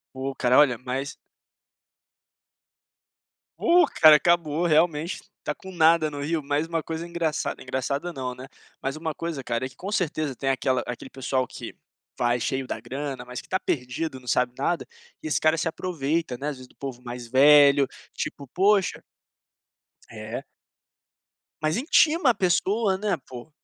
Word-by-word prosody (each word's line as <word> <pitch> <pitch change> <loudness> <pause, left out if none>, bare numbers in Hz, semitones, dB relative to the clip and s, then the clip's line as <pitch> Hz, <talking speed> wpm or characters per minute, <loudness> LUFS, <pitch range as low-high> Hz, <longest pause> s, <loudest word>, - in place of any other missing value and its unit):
Pô, 135 +1 -3
cara, 125 -1 +2
olha, 140 -5 +5
mas 130 +5 -4 2.4
Pô, 350 0 +5 0.2
cara, 155 -2 +10
acabou, 170 0 +1
realmente 165 +1 +2 0.2
está - - -4
com 190 - -11
nada 160 -2 +4
no 145 - -6
Rio, 155 +1 -1
mas 145 +3 -1
uma 165 -1 -2
coisa 165 +1 -5
engraçada, 170 -3 -2
engraçada 140 +6 -2
não, 130 -5 -5
né, 130 +1 -10 0.3
mas 135 +2 -3
uma 160 0 -3
coisa, 165 -4 -4
cara, 115 +2 -1
é - - -5
que - - -21
com 190 - -6
certeza 155 -7 -1
tem 135 +2 -2
aquela 130 -1 +1
aquele 125 +2 -7
pessoal 130 -1 -1
que: - - -8 0.5
vai 120 0 +2
cheio 130 +2 -2
da - - -3
grana, 135 -2 -5
mas 125 0 -7
que - - -13
está 185 - +1
perdido, 130 0 -3
não 125 - -18
sabe 125 0 +2
nada, 170 +5 -1 0.4
e - - -3
esse 155 - +1
cara 155 +1 +3
se 165 - 0
aproveita, 160 -5 -2
né, 145 +3 -3
às 145 - -6
vezes, 130 0 -12
do - - -26
povo 130 -3 -7
mais 120 -1 -7
velho, 140 +1 +6 0.3
tipo: 140 - -5
"Poxa" 195 +5 +2 1.1
É. - - -6 1.2
Mas 155 +4 +1
intima 305 +2 +4
a - - +5
pessoa, 195 +2 +1
né, 205 +1 0
põ. 125 +2 -9
150 Hz, 165 wpm, -25 LUFS, 130-170 Hz, 2.4 s, cara